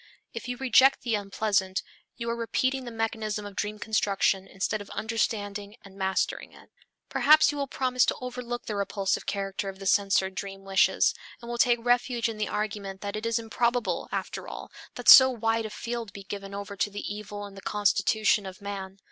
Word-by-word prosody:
If -, -, -6 dB
you 245 Hz, 0 st, -3 dB
reject 265 Hz, +1 st, +4 dB
the 235 Hz, -, -1 dB
unpleasant, 195 Hz, -2 st, 0 dB, 0.3 s
you 235 Hz, -, -5 dB
are -, -, -1 dB
repeating 255 Hz, +3 st, -1 dB
the 240 Hz, -, -6 dB
mechanism 220 Hz, -2 st, -2 dB
of 205 Hz, -1 st, -9 dB
dream 210 Hz, +1 st, -3 dB
construction 200 Hz, -3 st, +1 dB
instead 200 Hz, +2 st, -2 dB
of 205 Hz, -, -11 dB
understanding 210 Hz, -2 st, -2 dB
and 195 Hz, -1 st, -14 dB
mastering 190 Hz, -1 st, -1 dB
it. -, -, -18 dB, 0.4 s
Perhaps 310 Hz, +1 st, +5 dB
you 290 Hz, -, -5 dB
will 280 Hz, -, -1 dB
promise 255 Hz, -2 st, +1 dB
to -, -, +1 dB
overlook 250 Hz, -1 st, -5 dB
the 215 Hz, -, -3 dB
repulsive 200 Hz, -1 st, -1 dB
character 195 Hz, 0 st, -2 dB
of 190 Hz, -, -8 dB
the 195 Hz, -, -9 dB
censored 195 Hz, -1 st, +2 dB
dream 195 Hz, 0 st, -6 dB
wishes, 195 Hz, 0 st, +3 dB, 0.3 s
and 235 Hz, 0 st, -8 dB
will 240 Hz, -, -4 dB
take 240 Hz, -2 st, +3 dB
refuge 245 Hz, 0 st, +2 dB
in 220 Hz, -2 st, -5 dB
the 210 Hz, -, 0 dB
argument 205 Hz, -2 st, -4 dB
that 200 Hz, 0 st, -4 dB
it 215 Hz, +2 st, -3 dB
is 230 Hz, -, +1 dB
improbable, 235 Hz, +1 st, -1 dB
after -, -, -4 dB
all, -, -, -8 dB, 0.2 s
that -, -, -7 dB
so 260 Hz, -1 st, +11 dB
wide 225 Hz, -2 st, 0 dB
a -, -, -9 dB
field 230 Hz, 0 st, -5 dB
be 200 Hz, -, -9 dB
given 200 Hz, 0 st, -7 dB
over 200 Hz, 0 st, -6 dB
to 200 Hz, -, 0 dB
the 205 Hz, 0 st, -6 dB
evil 205 Hz, 0 st, -7 dB
in 200 Hz, -, -11 dB
the 195 Hz, -, -11 dB
constitution 210 Hz, 0 st, +2 dB
of 190 Hz, 0 st, -9 dB
man. 195 Hz, -1 st, -6 dB
210 Hz, 195 wpm, -27 LUFS, 200-235 Hz, 0.4 s, so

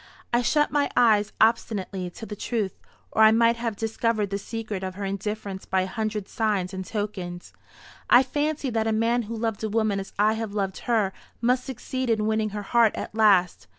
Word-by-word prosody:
"I 240 Hz, -, +4 dB
shut 295 Hz, +5 st, +2 dB
my 290 Hz, -1 st, +1 dB
eyes 215 Hz, -3 st, +4 dB
obstinately 200 Hz, -5 st, +1 dB
to 225 Hz, -, -9 dB
the 210 Hz, -, -6 dB
truth, 215 Hz, -2 st, -2 dB, 0.4 s
or -, -, +1 dB
I 220 Hz, -, +9 dB
might 230 Hz, +1 st, +4 dB
have 230 Hz, -2 st, -2 dB
discovered 220 Hz, -1 st, -1 dB
the 200 Hz, -, -1 dB
secret 215 Hz, -2 st, -5 dB
of 185 Hz, -1 st, -4 dB
her 200 Hz, 0 st, -4 dB
indifference 200 Hz, 0 st, -4 dB
by 190 Hz, 0 st, +2 dB
a -, -, -1 dB
hundred 215 Hz, 0 st, -3 dB
signs 205 Hz, -4 st, -1 dB
and 190 Hz, 0 st, -4 dB
tokens. 185 Hz, -4 st, -5 dB, 0.6 s
I 245 Hz, -, +7 dB
fancied 290 Hz, -1 st, -2 dB
that 225 Hz, -1 st, +1 dB
a 220 Hz, -, +1 dB
man 230 Hz, +2 st, +2 dB
who 230 Hz, -, -4 dB
loved 225 Hz, -2 st, -2 dB
a 220 Hz, -, -1 dB
woman 215 Hz, -2 st, +1 dB
as 195 Hz, -, -7 dB
I 215 Hz, +2 st, +2 dB
loved 200 Hz, -3 st, -3 dB
her 210 Hz, -5 st, +2 dB, 0.3 s
must 250 Hz, +2 st, +1 dB
succeed 260 Hz, 0 st, -4 dB
in 220 Hz, -2 st, +1 dB
winning 220 Hz, 0 st, +1 dB
her 205 Hz, 0 st, -5 dB
heart 230 Hz, +1 st, +3 dB
at -, -, -5 dB
last. 200 Hz, -5 st, +3 dB
220 Hz, 195 wpm, -25 LUFS, 200-230 Hz, 0.6 s, I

